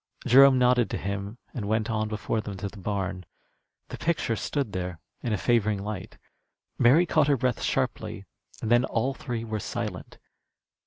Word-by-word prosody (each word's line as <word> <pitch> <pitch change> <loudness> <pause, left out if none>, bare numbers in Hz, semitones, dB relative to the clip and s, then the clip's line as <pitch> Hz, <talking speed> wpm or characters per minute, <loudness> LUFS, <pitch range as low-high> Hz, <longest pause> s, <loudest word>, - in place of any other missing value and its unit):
Jerome 135 +1 +7
nodded 125 -1 +3
to - - -2
him 100 +2 -4 0.2
and 105 -6 -4
went 110 0 +1
on 110 -1 -1
before 110 +1 -2
them 100 -2 -6
to 100 - -3
the 100 +1 -11
barn. 95 -1 -3 0.7
The - - -7
picture 155 -8 0
stood 135 0 -2
there 90 -2 -4 0.2
in 120 - -2
a 105 - +1
favoring 110 -2 +2
light. 105 -2 -6 0.6
Mary 145 +9 +6
caught 155 -4 +3
her 140 -2 +3
breath 125 -1 0
sharply, - - -2 0.4
and 110 - -1
then 120 +1 +5
all 130 +1 0
three 120 -4 -4
were 110 -2 -3
silent. - - -5
110 Hz, 170 wpm, -27 LUFS, 100-125 Hz, 0.7 s, Jerome